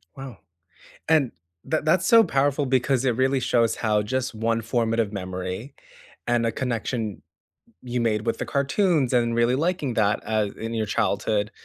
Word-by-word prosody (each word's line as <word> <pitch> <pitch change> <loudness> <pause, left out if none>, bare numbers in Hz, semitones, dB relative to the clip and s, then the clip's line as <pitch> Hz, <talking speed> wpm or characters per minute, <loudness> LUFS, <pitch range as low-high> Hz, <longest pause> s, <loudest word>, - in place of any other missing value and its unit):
Wow. 135 -5 -9 0.7
And 150 -6 +3 0.3
that 155 -1 -1
that's 175 +4 +2
so 230 -1 +7
powerful 140 -3 +1
because 130 0 +1
it 125 -3 +1
really 130 +1 +2
shows 120 -2 +1
how 105 -2 +1
just 130 +3 -2
one 115 +1 -1
formative 115 -2 0
memory 95 +6 -5 0.5
and 120 -1 +2
a 115 - +1
connection 115 -4 -3 0.6
you 125 0 -3
made 110 -2 0
with 115 - -1
the - - -2
cartoons 140 - +1
and 120 -2 +2
really 120 +1 +2
liking 155 -3 -1
that 105 -1 +1
a 110 -2 0
in 115 +1 -4
your 110 -1 -1
childhood 105 0 0
120 Hz, 160 wpm, -24 LUFS, 110-135 Hz, 0.7 s, so